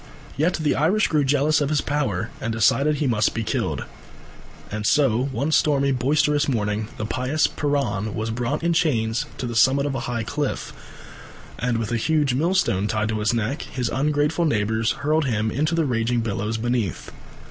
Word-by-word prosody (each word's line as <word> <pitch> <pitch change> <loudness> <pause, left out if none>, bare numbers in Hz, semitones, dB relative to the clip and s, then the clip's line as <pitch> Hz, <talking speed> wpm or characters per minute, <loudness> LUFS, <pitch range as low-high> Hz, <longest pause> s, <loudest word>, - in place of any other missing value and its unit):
Yet 160 +6 +1
the 155 -2 0
Irish 180 +9 +2
grew 150 -2 +2
jealous 145 +3 +2
of 145 - 0
his 155 -1 +2
power 115 -9 -2
and 115 - -2
decided 130 +7 +2
he 145 - -1
must 110 -5 +1
be 115 - -1
killed. - - -2 0.9
And 105 0 -3
so 130 0 +3
one 140 +3 -2
stormy, 140 -3 +3
boisterous 145 +3 +1
morning 105 -3 -1
the 110 - -3
pious 130 +7 0
Piran 140 -8 -1
was 110 +1 -2
brought 125 +7 -2
in 170 0 +2
chains 115 -9 +1
to - - -4
the 120 -1 -4
summit 130 +5 +4
of 145 - -1
a 135 - -2
high 120 -2 -2
cliff, 145 +5 -3 0.9
and 120 0 0
with 115 0 -3
a 120 - +1
huge 150 +2 +1
millstone 145 - +1
tied 110 0 -1
to 110 -1 -1
his 105 +2 +1
neck 120 +5 -1
his 125 -2 -3
ungrateful 150 +4 +1
neighbours 110 -4 +1
hurled 155 +1 0
him 110 -3 0
into 155 +7 0
the 165 -2 +1
raging 120 -2 0
billows 110 0 -2
beneath. 115 -5 -2
130 Hz, 180 wpm, -23 LUFS, 110-150 Hz, 0.9 s, summit